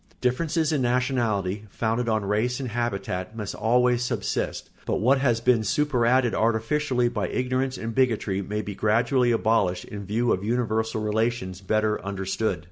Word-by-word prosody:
Differences 155 +5 0
in 145 - +1
nationality, 120 -6 0
founded 115 +3 -1
on 110 -2 0
race 110 +6 0
and 130 -3 -3
habitat, 105 -3 -3
must 105 -3 -4
always 125 +2 +2
subsist; 125 - -2 0.2
but - - +1
what 130 +6 +3
has 120 -4 +2
been 120 -2 +3
superadded 125 -2 +2
artificially 120 +3 +1
by 105 -6 -2
ignorance 130 +3 -1
and 115 0 -4
bigotry 110 -6 +1
may 105 +2 -3
be 100 - -5
gradually 120 +5 +2
abolished 110 -6 +1
in 100 -2 -8
view 115 +3 +1
of 95 - -2
universal 110 -1 0
relations 105 -3 -1
better 110 +2 0
understood. 100 +2 -2
115 Hz, 150 wpm, -25 LUFS, 105-125 Hz, 0.2 s, what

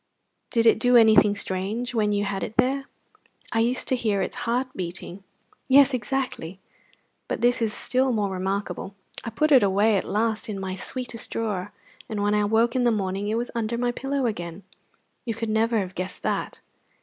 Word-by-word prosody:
Did 230 -2 +1
it 225 - +5
do 245 +1 +5
anything 215 -2 +6
strange 205 +6 -3
when 215 -3 +1
you 205 0 0
had 195 -1 -3
it 220 - -5
there?" 270 +2 +2 0.7
"I 225 - +1
used 240 +3 0
to 260 - +3
hear 215 -5 0
its - - -4
heart 250 +2 0
beating." 180 +1 -6 0.5
"Yes, 275 +1 +6
exactly! 245 -7 -3 0.7
But - - -3
this 245 +1 +3
is 225 -2 +1
still 255 +4 +1
more 205 -4 0
remarkable. 190 +1 -3 0.3
I - - -4
put 305 +7 0
it 265 -3 +8
away 205 +2 +3
at - - -1
last 220 +1 -1
in 200 -2 -4
my 190 -1 -4
sweetest 240 +4 -4
drawer, 205 -4 -3 0.4
and 215 -2 -3
when 205 0 +2
I 210 0 +2
woke 225 +3 +2
in 255 - +2
the 240 - +4
morning 195 -1 -2
it 215 - 0
was 240 +1 -2
under 230 0 -2
my 245 0 0
pillow 270 +2 -2
again. 175 -4 -4 0.6
You 230 -3 -3
could 230 -1 -3
never 225 +1 +2
have 190 -3 -2
guessed 185 0 -5
that." - - -2
220 Hz, 190 wpm, -25 LUFS, 200-240 Hz, 0.7 s, it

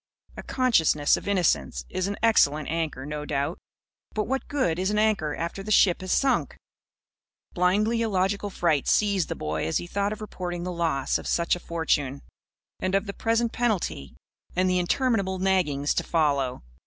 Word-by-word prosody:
A - - -7
consciousness 165 - +2
of - - -7
innocence 80 - +1
is 185 - -2
an 200 - -3
excellent 155 -10 +3
anchor, 160 -5 -2
no 150 0 -4
doubt. 145 +3 -2 0.6
But 215 - +1
what 265 +4 -3
good 180 - 0
is 190 +1 0
an 210 - 0
anchor 210 -9 +1
after 170 +4 -4
the 205 - -8
ship 190 -4 +4
has 185 - -4
sunk? 270 -1 +1 1.0
Blindly 210 +6 +2
illogical 200 -1 0
fright 165 -7 0
seized 200 -4 +2
the - - -2
boy 80 +1 -3
as 80 - +1
he - - -4
thought 200 +3 -1
of 215 - -5
reporting 180 -4 -5
the 180 - -3
loss 165 -6 0
of - - -8
such 170 0 +1
a - - -7
fortune 150 -5 -1 0.6
and 185 +1 0
of 195 - +1
the 200 - -5
present 230 +2 0
penalty 190 - -2 0.4
and 185 +1 +2
the 180 0 +2
interminable 195 0 0
naggings 180 -7 +1
to - - -1
follow. 140 - 0
180 Hz, 175 wpm, -26 LUFS, 150-205 Hz, 1.0 s, ship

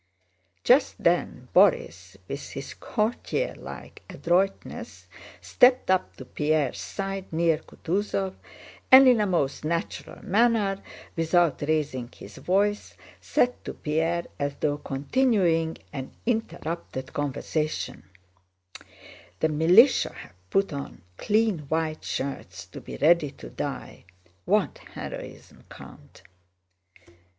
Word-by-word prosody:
Just - - +4
then - - 0
Borís, 90 +2 +3
with 140 - -6
his 135 - -6
courtierlike 240 - -3
adroitness, 185 +3 -1 0.4
stepped 250 -5 +4
up 185 -1 +1
to - - -9
Pierre's 150 -3 0
side 195 -1 -5
near 165 -1 +2
Kutúzov 190 +3 -2 0.6
and 260 +1 +10
in 245 -4 +5
a 210 - +1
most 150 -8 0
natural 165 +2 -4
manner, 205 -1 +2 0.3
without 165 0 +2
raising 145 -5 -1
his - - -12
voice, 205 +3 0 0.2
said 245 0 0
to - - -6
Pierre, 165 +3 -1
as 145 0 -2
though 145 -1 -1
continuing 165 - +1 0.2
an 135 -1 -6
interrupted 170 - -3
conversation: 145 - -3 1.3
"The 160 - +2
militia 175 - +5
have 90 +1 -14
put 195 - +1
on 140 -9 -7
clean 215 -4 +1
white 160 -1 -1
shirts 135 +1 -5
to - - -11
be - - -8
ready 160 0 +4
to - - -11
die. - - -6 0.4
What - - +1 0.2
heroism, - - -9
Count!" - - -14
165 Hz, 105 wpm, -26 LUFS, 145-200 Hz, 1.3 s, and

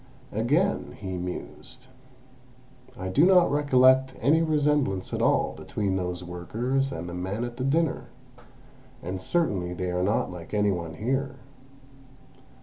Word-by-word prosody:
"Again," 150 - 0
he 95 -3 -5
mused, 90 +8 -7 1.1
"I 95 - -4
do 140 - +3
not 180 -1 +5
recollect 130 -2 +4
any 150 +7 +3
resemblance 150 - +1
at - - -1
all - - +2
between 100 -3 -2
those 90 -1 -3
workers 115 +11 -2
and 80 +2 -5
the 85 - -6
men 95 +6 -3
at 120 0 -6
the 125 - -3
dinner, 140 -2 +1 1.0
and 95 +1 -4
certainly 95 - 0
they 90 0 -3
are 90 0 -1
not 100 0 0
like 90 +3 -7
any 105 -1 +3
one 85 -3 -4
here. 135 - -2
115 Hz, 140 wpm, -26 LUFS, 90-135 Hz, 1.1 s, not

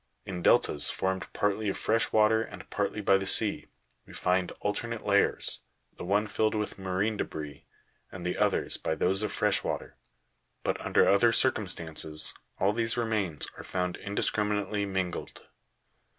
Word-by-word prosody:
In 90 -2 -5
deltas 75 - +4
formed 95 0 -2
partly 105 +1 0
of 95 - -2
fresh 115 +1 +1
water 110 +1 +4
and 115 - -8
partly 105 - -1
by 95 -1 +4
the 95 - -4
sea, - - +2 0.4
we - - -13
find 90 0 0
alternate 115 +2 -2
layers, 100 -1 +3 0.4
the - - -8
one 100 +4 +1
filled 110 +1 0
with 105 -2 -3
marine 95 +3 -1
debris, 75 -5 -6 0.5
and 90 -1 -8
the 90 - -1
others - - +1
by 80 - -2
those 95 +4 +2
of 105 -2 -2
fresh 105 -2 +1
water; - - -4 0.7
but, - - -1
under - - +3
other 115 +4 +5
circumstances, 85 -10 -1 0.2
all 100 +2 +2
these 115 +1 0
remains 105 -9 -1
are - - -8
found 90 -1 -2
indiscriminately 105 0 -1
mingled. 95 -2 -3
100 Hz, 150 wpm, -29 LUFS, 90-105 Hz, 0.7 s, other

